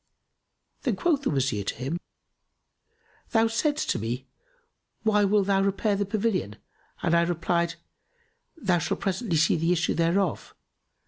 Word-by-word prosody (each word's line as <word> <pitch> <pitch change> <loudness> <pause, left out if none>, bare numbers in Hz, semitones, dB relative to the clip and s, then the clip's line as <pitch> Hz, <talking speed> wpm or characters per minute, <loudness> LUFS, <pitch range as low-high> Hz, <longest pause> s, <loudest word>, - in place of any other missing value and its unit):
Then - - 0
quoth 325 -6 +1
the 280 - 0
Wazir 130 -7 0
to - - -3
him, 135 +8 -3 1.3
"Thou 225 -1 +3
saidst 290 +7 0
to - - -1
me, 120 +4 -3 0.8
'Why 210 -2 +3
wilt 200 0 +3
thou 195 -1 +2
repair 200 +2 +1
the 200 0 -1
pavilion?'; 200 - -1 0.5
and 170 - +2
I 170 - +5
replied, 170 0 0 0.8
'Thou 185 - +1
shalt - - -2
presently 195 -2 -1
see 160 +2 +3
the 165 +2 +1
issue 170 -2 +1
thereof. 170 +1 0
180 Hz, 140 wpm, -26 LUFS, 165-210 Hz, 1.3 s, I